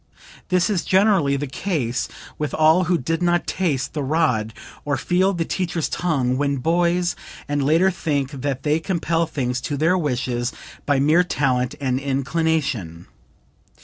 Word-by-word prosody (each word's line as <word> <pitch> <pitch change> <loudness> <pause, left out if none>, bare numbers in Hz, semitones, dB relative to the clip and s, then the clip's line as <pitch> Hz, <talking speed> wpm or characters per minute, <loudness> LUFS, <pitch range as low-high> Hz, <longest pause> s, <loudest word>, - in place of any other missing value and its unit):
"This 180 -1 +3
is 200 -6 0
generally 190 -8 +3
the 140 +1 -2
case 135 -4 -2 0.3
with 150 -1 -2
all 160 +4 +4
who 175 0 +2
did 165 +5 -2
not 175 0 +2
taste 145 -8 -1
the 150 - -2
rod 130 -7 +1 0.3
or 145 -2 -1
feel 180 +7 +2
the 170 -3 -2
teacher's 170 -3 -2
tongue 135 -8 0
when 140 -1 0
boys, 175 +4 +1 0.3
and 145 0 0
later 165 +7 +3
think 145 -6 -2
that 135 -1 -3
they 150 +1 +2
can 185 +3 -2
compel 165 0 0
things 125 -3 -2
to 145 +1 -3
their 165 +5 +3
wishes 125 -4 -1 0.3
by 145 -2 +3
mere 155 +6 +4
talent 130 -7 0
and 130 -2 0
inclination. 140 - -1
150 Hz, 155 wpm, -22 LUFS, 135-170 Hz, 0.3 s, all